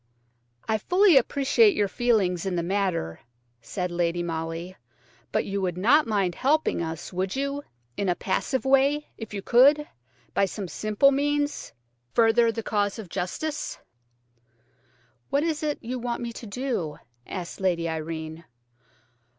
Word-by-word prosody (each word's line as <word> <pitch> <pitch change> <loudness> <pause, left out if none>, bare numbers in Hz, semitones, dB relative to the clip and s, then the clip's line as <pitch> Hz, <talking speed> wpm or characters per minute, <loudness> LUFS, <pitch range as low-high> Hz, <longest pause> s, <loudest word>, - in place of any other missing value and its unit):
"I 220 -1 +1
fully 365 - +4
appreciate 285 - +4
your 205 - +2
feelings 195 -6 +1
in 185 - -1
the 170 - 0
matter," 180 - -1 0.4
said 180 - -4
Lady 175 0 0
Molly, 165 +2 -4 0.6
"but - - 0
you 200 0 -2
would 180 -2 -1
not 265 +10 +4
mind 200 -5 +1
helping 290 - +1
us–would 180 - -3
you?–in 200 - -4
a 175 - +2
passive 260 +9 -1
way, 275 +3 +3
if 225 -2 -8
you 200 -2 -5
could, 285 +5 +5 0.5
by 200 - +3
some 195 0 -5
simple 215 +9 +2
means, 290 +1 -1 0.4
further 230 0 +5
the 225 0 -5
cause 205 -1 0
of 215 -6 -8
justice." 245 - -3 1.5
"What 285 +2 +2
is 320 -2 -1
it 300 -1 -1
you 250 +2 -3
want 240 0 -3
me 235 -1 -4
to 230 - -9
do?" 205 - -3 0.3
asked 185 0 -6
Lady 175 -3 +1
Irene. 160 0 -5
205 Hz, 140 wpm, -26 LUFS, 175-270 Hz, 1.5 s, could